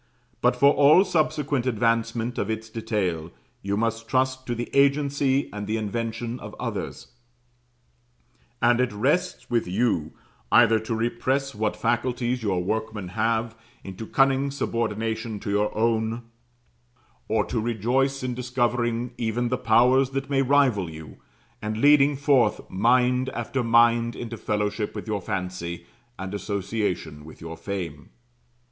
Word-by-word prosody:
But - - +3
for 140 +1 +5
all 150 +7 +6
subsequent 150 -6 0
advancement 115 0 0
of 100 - -2
its 110 0 -4
detail, 100 -8 -2 0.3
you 100 +1 -2
must 115 +1 -1
trust 130 +1 0
to 120 - -1
the 120 +1 -4
agency 140 -1 +2
and 105 -1 -5
the 110 +1 0
invention 115 +2 -3
of - - -9
others; - - -5 1.5
and 120 +1 +4
it 125 - 0
rests 135 +13 0
with 115 -4 +1
you 90 -5 0 0.4
either 110 0 +6
to 110 +1 -3
repress 125 +4 -1
what 105 0 -1
faculties 120 +1 -1
your 95 -5 0
workmen 110 -1 -3
have, 115 +3 -1 0.3
into 95 +3 -8
cunning 135 0 +2
subordination 110 -4 -2
to 105 - -3
your 105 +1 +1
own; 115 +1 0 1.0
or 110 - +1
to 120 - -2
rejoice 125 +5 0
in 125 -1 -2
discovering 120 -1 -1
even 120 +1 -1
the 125 - +1
powers 125 +4 +4
that 135 +1 -4
may 135 -1 +3
rival 130 -9 +2
you, 80 -2 -10 0.4
and 110 0 -3
leading 145 +2 +5
forth 135 -6 +2
mind 125 +5 +2
after 120 +2 -2
mind 115 0 +4
into 115 -1 -6
fellowship 105 0 -2
with - - -5
your 105 -3 -2
fancy, 85 -2 -4 0.3
and 95 +1 -6
association 100 -6 -3
with 80 - -13
your 80 0 -7
fame. 85 -7 -6
115 Hz, 140 wpm, -25 LUFS, 105-130 Hz, 1.5 s, all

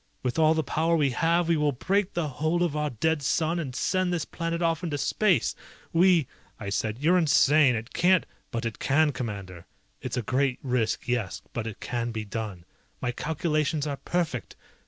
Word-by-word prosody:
With 125 +3 -1
all 160 0 +5
the 160 - +1
power 160 +4 +1
we 145 -4 +2
have 170 +5 +2
we 170 -1 +3
will 150 -1 +2
break 195 +9 0
the 170 -3 0
hold 155 +5 0
of 165 -4 -1
our 150 0 0
dead 160 +5 0
sun 160 +4 +1
and 135 -6 -5
send 185 +5 +1
this 170 -4 -1
planet 165 0 -3
off 165 0 0
into 155 -4 -2
space! 190 +6 +2 0.4
We 175 -2 +5 0.2
..." - - -33
I 100 - -5
said, 110 +2 -1
"You're 170 +7 +3
insane! 145 -3 +5
It 115 +2 -6
can't 180 0 +3
..." - - -40
"But 115 0 -3
it 115 - -4
can, 150 +2 +3
Commander. 100 -9 -6 0.3
It's - - -4
a 125 - -1
great 130 +2 +1
risk, 125 -4 -1
yes, 105 -7 -2
but 115 -1 -3
it 110 - -7
can 120 -1 -2
be 110 -1 -4
done, 100 -5 -5 0.3
my 125 - -1
calculations 155 +1 -1
are 145 -2 -3
perfect! 160 - -2
150 Hz, 200 wpm, -27 LUFS, 120-165 Hz, 0.4 s, all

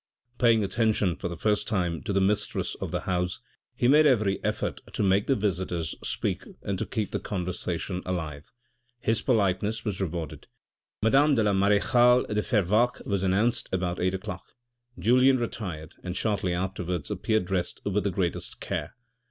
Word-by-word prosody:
Paying 115 -3 +4
attention 105 -4 +1
for - - -4
the 85 -1 -6
first 105 +3 0
time 90 -5 -1
to - - -1
the 100 - +2
mistress 100 +2 0
of - - -2
the - - -2
house, 90 -1 -1 0.4
he 120 - +2
made 150 +3 +6
every 110 -7 +2
effort - - -2
to - - -1
make 100 +1 +3
the 135 - +3
visitors 90 -6 -1
speak - - -2 0.2
and 100 -2 -2
to - - -2
keep 110 -2 -2
the - - -1
conversation 90 -1 -3
alive. 80 -5 -4 0.5
His 115 -1 0
politeness 105 -1 +1
was 100 -3 -2
rewarded; 85 -4 -4 0.6
madame 140 +6 +5
la 105 -4 +2
marechale 120 +6 +4
de 105 0 0
Fervaques 110 +3 +1
was 100 -3 0
announced 100 +5 +1
about 90 -1 -1
eight 95 +1 +1
o'clock. 95 0 -6 0.5
Julien 125 +8 +5
retired 90 -10 -5
and 90 0 -4
shortly 100 -4 0
afterwards 90 -3 -3
appeared 110 -4 0
dressed 90 -1 -2
with 100 0 0
the 100 - +1
greatest 90 -2 -2
care. - - -4
100 Hz, 160 wpm, -27 LUFS, 90-110 Hz, 0.6 s, made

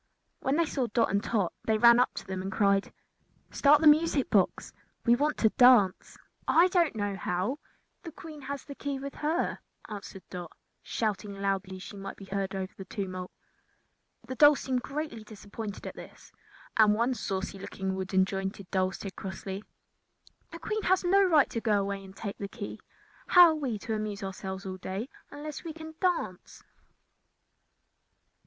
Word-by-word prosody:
When 270 - 0
they 335 +1 +3
saw 270 -5 -1
Dot 230 +1 +1
and 200 +2 +1
Tot 205 -7 0
they 220 -1 +2
ran 235 +2 +7
up 250 - +3
to - - -6
them 190 -1 -4
and 190 +1 -4
cried: 200 0 +2 0.6
"Start 295 +1 +5
the 315 - +5
music 300 -2 +4
box! 195 -4 +1 0.3
We 235 -1 +6
want 295 +4 0
to 220 - +4
dance." 245 -7 +5 0.3
"I 350 +3 +5
do 355 -1 +4
not 295 - -7
know 205 -2 -2
how. 190 +9 -2 0.4
The 335 - -8
Queen 310 -2 -10
has 280 0 -6
the 285 - -8
key 280 0 -4
with 275 +1 -6
her," 315 +4 -1 0.3
answered 200 -2 -8
Dot, 175 -2 -6 0.3
shouting 210 -2 -2
loudly 195 -1 -1
that 185 - -9
she 205 - -9
might 195 0 -7
be 195 - -11
heard 195 0 -3
above 190 0 -4
the 190 - -8
tumult. 185 -2 -5 1.0
The 260 - -4
dolls 290 +2 +6
seemed 255 -2 -1
greatly 275 -5 -5
disappointed 210 -1 -8
at - - -6
this, - - -12 0.5
and 215 -2 +6
one 235 +4 +1
saucy 195 -3 -4
looking 190 0 -4
wooden 190 0 +1
jointed 195 0 -5
doll 185 -1 +1
said 195 -1 -7
crossly: 195 0 -6 0.9
"The - - -7
Queen 435 0 -3
has 375 -1 +2
no 390 +3 +5
right 315 -7 +4
to 230 - -2
go 210 -3 +2
away 200 0 -3
and 190 0 -13
take 200 -1 -6
the 200 - -3
key. 205 0 -7 0.5
How 355 -2 +9
are - - +2
we 265 -8 -2
to 220 +2 -4
amuse 215 -2 -3
ourselves 190 0 -5
all 185 -1 -5
day 190 +7 -5 0.2
unless 295 0 -7
we 330 -2 -6
can 315 0 -9
dance?" 350 - -2
215 Hz, 180 wpm, -29 LUFS, 195-285 Hz, 1.0 s, How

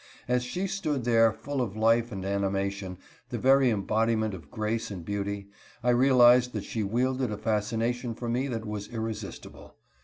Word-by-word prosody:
As 125 0 +2
she 180 +10 -3
stood 155 -9 -2
there, 115 -1 +4
full 140 +4 -4
of 110 -4 -3
life 115 +2 +3
and 95 -2 -5
animation, 100 -1 -2 0.3
the - - -3
very 135 0 +4
embodiment 110 0 +1
of 90 -3 -10
grace 110 +1 -2
and 90 -5 -7
beauty, 100 0 -3 0.3
I 125 - +4
realized 125 -1 +5
that 105 -3 -3
she 110 - -3
wielded 125 +4 0
a 105 - -3
fascination 115 +3 -1
for 120 - -6
me 125 +4 0
that 115 -4 -4
was 105 -1 -5
irresistible. 110 -2 -7
115 Hz, 165 wpm, -28 LUFS, 105-125 Hz, 0.3 s, realized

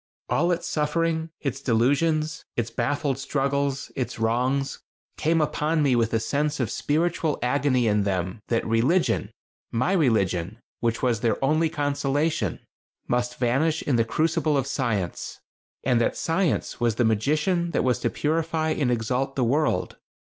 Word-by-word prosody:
All 175 +1 +2
its 175 0 -1
sufferings, 160 +1 0
its 135 -1 -3
delusions; 150 +6 +1
its 115 -1 -1
baffled 135 +2 -1
struggles; 140 0 -1
its 130 - -3
wrongs, 125 +5 0 0.4
came 165 +1 +1
upon 155 +1 +1
me 135 -3 +3
with 115 -2 +1
a 115 - +2
sense 145 +6 -1
of 120 -6 -1
spiritual 160 0 0
agony 130 -1 +2
in 105 -1 +2
them 95 0 -2
that 115 - 0
religion 125 +11 +2 0.4
my 125 +10 +1
religion, 105 - +1 0.2
which 115 +1 -1
was 120 -3 +2
their 110 -2 +1
only 155 +3 +2
consolation 145 - -1 0.5
must 125 0 -1
vanish 140 +7 +1
in 140 - +1
the 115 - +4
crucible 155 +5 +1
of 135 - 0
Science. 115 -10 -2 0.4
And 125 -3 +2
that - - 0
Science 165 +1 0
was 120 -3 +1
the 120 - +2
magician 155 - +1
that - - 0
was 125 -1 +1
to - - 0
purify 160 +1 0
and 145 -5 0
exalt 125 +3 -1
the 130 - +1
world. 130 -5 0
135 Hz, 150 wpm, -25 LUFS, 115-155 Hz, 0.5 s, the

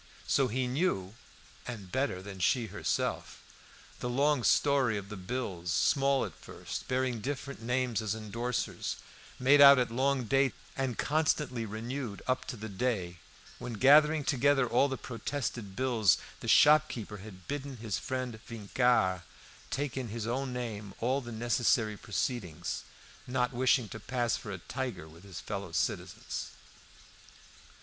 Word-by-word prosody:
So 135 - +3
he 125 +3 -1
knew 125 - 0 0.5
(and 105 -7 -7
better 130 -8 -1
than 95 -1 -8
she 115 +6 +2
herself) - - -2 0.6
the 125 - -3
long 140 +1 +2
story 135 -6 +3
of 100 -1 -7
the 105 - -6
bills, 95 -4 -4
small 140 - +3
at - - -7
first, - - -7
bearing 130 -2 0
different 140 0 -4
names 125 -1 0
as 110 -1 -1
endorsers, 115 +3 -3 0.4
made 140 +3 +5
out 140 0 +10
at 125 -2 +1
long 135 +2 +1
dates, 135 +4 +2 0.2
and 130 -4 -2
constantly 150 -5 0
renewed 115 +1 -5
up 130 0 0
to 125 - -6
the 110 +1 -6
day, 95 -5 -2 0.4
when, 120 - -5
gathering 150 +6 +6
together 135 -1 +3
all 120 +4 +3
the 135 -1 -3
protested 120 -4 -4
bills, 115 - +3 0.2
the - - -7
shopkeeper 125 -8 +4
had 95 -2 -12
bidden 140 -2 -4
his 110 -7 -3
friend 130 -3 -4
Vincart 110 -4 +2 0.5
take 140 -1 -2
in 130 -2 -3
his 110 0 -4
own 130 +3 -2
name 110 -5 -5
all 130 +4 +1
the 120 -2 -8
necessary 115 -1 +1
proceedings, 105 - -3 0.4
not 125 0 0
wishing 125 -1 +3
to 110 - -7
pass 120 +1 0
for - - -7
a 95 - -4
tiger 120 -4 -5
with 80 +3 -15
his 95 -5 -8
fellow 100 -4 -5
citizens. 80 - -2
120 Hz, 145 wpm, -31 LUFS, 105-135 Hz, 0.6 s, out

